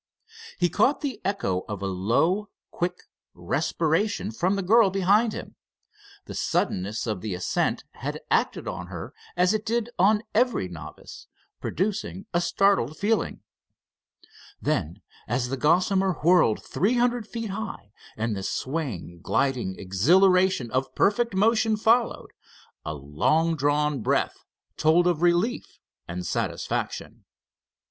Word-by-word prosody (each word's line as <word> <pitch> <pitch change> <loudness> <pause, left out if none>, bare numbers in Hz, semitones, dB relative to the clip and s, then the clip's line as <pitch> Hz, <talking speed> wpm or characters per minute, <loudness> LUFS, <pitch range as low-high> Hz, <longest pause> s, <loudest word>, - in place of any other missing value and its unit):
He 175 - +3
caught 210 - +2
the 265 -8 -4
echo 195 - 0
of 100 -2 -5
a - - -1
low, 120 - +1 0.2
quick 180 +1 -3 0.3
respiration 160 - 0
from 180 - 0
the 195 - -2
girl 220 +2 +5
behind 200 +4 +3
him. - - -8 0.7
The - - -8
suddenness 100 +4 -1
of 105 -6 -3
the 105 -4 -3
ascent 90 - -1
had - - -5
acted - - +1
on - - -5
her - - -7 0.2
as 180 +3 +4
it 215 -1 -1
did 235 +1 -1
on 210 +3 +4
every 245 - +2
novice, 80 -3 -10 0.3
producing 195 0 -2
a 175 - +2
startled 175 -5 +2
feeling. 215 +2 0 1.2
Then, 85 +7 -2 0.2
as 120 +2 -1
the 135 - -1
Gossamer 185 +6 +3
whirled 170 -10 +4
three 215 +7 +1
hundred 240 -2 +1
feet 230 -2 -5
high, 205 - -6 0.3
and 110 0 -1
the 95 - -4
swaying, 115 - -4
gliding 115 -1 0
exhilaration 175 - +3
of 130 0 -1
perfect 230 +1 +2
motion 220 +2 +3
followed, 230 +2 +2 0.5
a 75 - -4
long 115 - +1
drawn 145 -1 +1
breath - - 0 0.3
told 160 +3 +4
of 175 -3 +1
relief 175 +7 +1 0.3
and 90 +1 -5
satisfaction. - - -3
175 Hz, 130 wpm, -26 LUFS, -, 1.2 s, girl